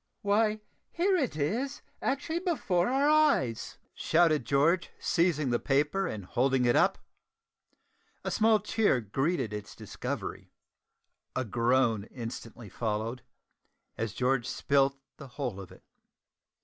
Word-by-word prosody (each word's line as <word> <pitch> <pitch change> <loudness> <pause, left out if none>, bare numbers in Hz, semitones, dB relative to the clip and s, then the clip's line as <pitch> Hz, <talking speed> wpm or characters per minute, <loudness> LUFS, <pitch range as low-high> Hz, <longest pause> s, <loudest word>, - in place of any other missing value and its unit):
"Why, 210 +1 +2 0.3
here 375 +3 +1
it 275 - 0
is, 235 - -2 0.2
actually 290 +5 -1
before 205 - 0
our 270 +3 +2
eyes!" 295 - +2 0.2
shouted 160 -5 +2
George, 150 +7 +2
seizing 155 -6 +1
the 120 - +1
paper 150 +8 +1
and 100 -4 -5
holding 130 +5 +1
it 120 - +3
up. - - +3 1.3
A - - -2
small 220 0 +4
cheer 210 - +1
greeted 120 - -1
its 105 -1 -7
discovery. - - -6 0.9
A 130 - -1
groan 115 -1 +1
instantly 115 -1 -8
followed, 110 +3 -3 0.7
as 110 -3 -3
George 125 -1 0
spilt 135 +2 +1 0.2
the 140 - -10
whole 120 -9 -3
of 95 - -12
it. - - -16
140 Hz, 125 wpm, -29 LUFS, -, 1.3 s, small